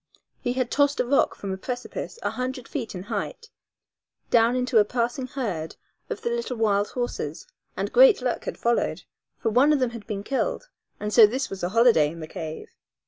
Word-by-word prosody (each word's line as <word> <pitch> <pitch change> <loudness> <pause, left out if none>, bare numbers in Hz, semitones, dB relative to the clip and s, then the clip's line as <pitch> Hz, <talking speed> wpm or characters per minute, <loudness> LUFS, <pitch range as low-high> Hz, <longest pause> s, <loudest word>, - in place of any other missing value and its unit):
He 245 - -1
had 255 -1 -1
tossed 285 0 +2
a 250 - +2
rock 275 +3 +2
from 195 - -5
a 190 - -3
precipice 245 - -5
a - - 0
hundred 255 -1 -4
feet 235 -9 -5
in 180 - -5
height 455 - -5 0.8
down 235 +1 +4
into 250 -2 +3
a - - +6
passing 240 +4 -2
herd 200 - -4 0.3
of - - -4
the 470 - 0
little 470 - -3
wild 205 -2 +2
horses, 245 -1 -4 0.3
and - - -3
great - - +7
luck 250 -1 -2
had - - -4
followed, 235 0 0 0.3
for 225 - -1
one 265 +7 +5
of 300 - +4
them 255 -2 +1
had 230 -3 -9
been 205 -2 -4
killed, - - -2 0.3
and 210 0 -3
so 225 -3 +9
this 260 +5 -3
was 195 - -6
a 175 - -1
holiday 225 -8 +5
in 170 - -10
the 160 - -5
cave. 160 -1 -7
240 Hz, 200 wpm, -25 LUFS, 210-260 Hz, 0.8 s, so